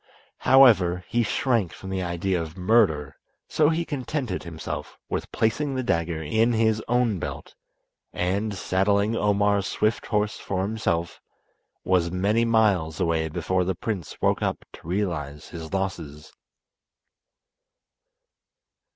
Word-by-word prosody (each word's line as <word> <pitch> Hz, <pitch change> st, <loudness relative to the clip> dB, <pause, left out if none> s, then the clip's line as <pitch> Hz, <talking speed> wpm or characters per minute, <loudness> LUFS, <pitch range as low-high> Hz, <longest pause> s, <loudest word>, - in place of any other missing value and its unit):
However, 95 Hz, -10 st, +5 dB
he 120 Hz, -, +1 dB
shrank 115 Hz, -4 st, 0 dB
from 95 Hz, -, -8 dB
the 95 Hz, -1 st, -1 dB
idea 90 Hz, +1 st, -1 dB
of 80 Hz, +2 st, -7 dB
murder, 90 Hz, -8 st, +2 dB, 0.3 s
so 150 Hz, -1 st, +3 dB
he 165 Hz, +1 st, 0 dB
contented 135 Hz, -, -3 dB
himself 85 Hz, -2 st, -6 dB
with -, -, -3 dB
placing 135 Hz, +6 st, 0 dB
the 130 Hz, -, -1 dB
dagger 85 Hz, -6 st, -1 dB
in 110 Hz, +10 st, +2 dB
his 110 Hz, -1 st, +2 dB
own 120 Hz, -5 st, +1 dB
belt, -, -, -6 dB, 0.6 s
and, 100 Hz, +4 st, -1 dB
saddling 100 Hz, +4 st, +1 dB
Omar's 100 Hz, -2 st, +2 dB
swift 105 Hz, 0 st, 0 dB
horse 105 Hz, -1 st, 0 dB
for 95 Hz, -1 st, -2 dB
himself, 95 Hz, -5 st, -2 dB, 0.6 s
was 90 Hz, -2 st, +2 dB
many 105 Hz, +6 st, +1 dB
miles 100 Hz, -9 st, +2 dB
away 80 Hz, -3 st, 0 dB
before 90 Hz, +3 st, 0 dB
the 95 Hz, +1 st, -1 dB
prince 95 Hz, -4 st, -5 dB
woke -, -, +1 dB
up -, -, -2 dB
to -, -, -13 dB
realise 85 Hz, -7 st, -3 dB
his 80 Hz, -2 st, -8 dB
losses. 85 Hz, -6 st, -4 dB
95 Hz, 125 wpm, -25 LUFS, 85-110 Hz, 0.6 s, However